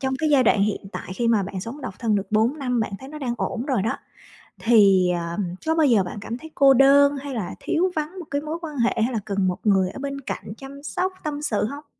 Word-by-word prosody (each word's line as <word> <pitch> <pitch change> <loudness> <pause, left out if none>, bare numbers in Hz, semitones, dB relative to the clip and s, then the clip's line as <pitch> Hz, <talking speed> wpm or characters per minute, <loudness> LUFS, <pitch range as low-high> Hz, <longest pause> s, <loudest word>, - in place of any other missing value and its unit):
trong 265 -1 -1
cái 315 - +1
giai 275 -3 +5
đoạn 205 -3 +4
hiện 210 0 0
tại 185 - -6
khi 235 +3 0
mà 220 -3 +3
bạn 190 0 -5
sống 235 +9 -7
độc 255 - -6
thân 225 -3 +1
được 200 -1 -1
4 225 +7 +2
năm, 250 -4 0
bạn 215 - -2
thấy 265 - -9
nó 300 +1 -8
đang 245 -4 -2
ổn 245 +1 -3
rồi 255 -9 +1
đó, 220 - -1 0.6
thì, 200 -6 +5
à, 170 0 -3 0.3
có 320 - +1
bao 320 -2 +4
giờ 225 -8 +4
bạn 180 - -7
cảm 230 +3 -5
thấy 320 +4 -12
cô 275 -1 +6
đơn 280 +2 +5
hay 275 0 -6
là 215 -7 -4
thiếu 365 +3 0
vắng 315 +4 -3
một 350 - -7
cái 285 - 0
mối 310 +2 -4
quan 305 -4 -6
hệ, 235 0 +2
hay 245 - 0
là 225 - 0
cần 200 -2 0
một 180 +1 -2
người 190 -3 +3
ở 235 - -9
bên 275 0 -4
cạnh 210 - -6
chăm 275 +1 -11
sóc, 365 +6 -1
tâm 295 -1 -3
sự 220 -9 0
hông? 285 +6 -7
255 Hz, 270 wpm, -23 LUFS, 210-285 Hz, 0.6 s, cô